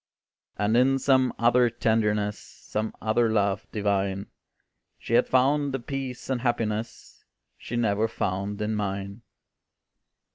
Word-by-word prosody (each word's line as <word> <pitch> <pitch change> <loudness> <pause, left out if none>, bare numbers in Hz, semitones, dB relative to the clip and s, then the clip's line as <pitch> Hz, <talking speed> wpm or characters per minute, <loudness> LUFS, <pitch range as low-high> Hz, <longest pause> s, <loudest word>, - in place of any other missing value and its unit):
And 105 +2 +1
in 130 +2 +4
some 130 -1 +3
other 120 +1 +4
tenderness, 105 -3 0
Some 110 +1 -5
other 110 +1 +2
love 100 -2 0
divine, 100 -2 -1 0.7
She - - -6
had - - +4
found 140 +2 +2
a - - -2
peace 130 0 -5
and 130 -3 -1
happiness, 115 -2 -3 0.3
She 120 - -7
never 110 -2 +1
found 100 0 -3
in 105 +1 -1
mine. 100 0 -3
110 Hz, 120 wpm, -26 LUFS, 105-125 Hz, 0.7 s, in